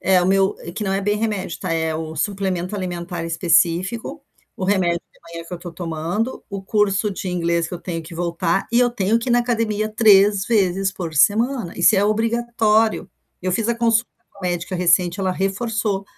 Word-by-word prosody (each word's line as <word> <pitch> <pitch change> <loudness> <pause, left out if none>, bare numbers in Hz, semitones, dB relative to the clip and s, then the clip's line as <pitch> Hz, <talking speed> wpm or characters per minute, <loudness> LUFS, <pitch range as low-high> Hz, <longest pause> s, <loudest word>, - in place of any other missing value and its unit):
é 185 -1 +3
o 175 - +1
meu 195 +1 +2
eh, 170 - -8
que 210 - -4
não 190 - -1
é 195 - 0
bem 205 +1 0
remédio, 210 -6 -3
tá, - - -2
é 160 -1 -1
o 160 0 -5
suplemento 190 0 -2
alimentar 175 -2 -4
específico, 175 - +1 0.3
o 190 - -3
remédio 180 -3 +1
da - - -31
manhã 165 0 -6
que 180 - -6
eu - - -7
tô 175 -1 -9
tomando, 170 +8 -3
o 200 -1 -5
curso 210 0 +1
de 190 -1 -5
inglês 170 -1 0
que - - -6
eu 175 - -7
tenho 165 -2 -4
que 165 +2 -11
voltar 170 +2 -1
e 235 - +4
eu 245 0 +3
tenho 225 -1 +1
que 235 +2 -5
ir - - +4
na 240 - +5
academia 225 -3 -1
3 205 -2 +5
vezes 195 -3 +1
por 165 -4 -6
semana. 220 - +2
Isso 215 - +5
é 200 - +3
obrigatório. 225 0 +1 0.3
Eu 185 0 -2
fiz 220 +4 0
a 235 - +2
consulta 230 0 +1 0.2
com - - -21
a - - -14
médica 175 +1 -3
recente, 175 +1 +2
ela 190 - 0
reforçou: 200 +1 -1
195 Hz, 210 wpm, -21 LUFS, 175-215 Hz, 0.3 s, na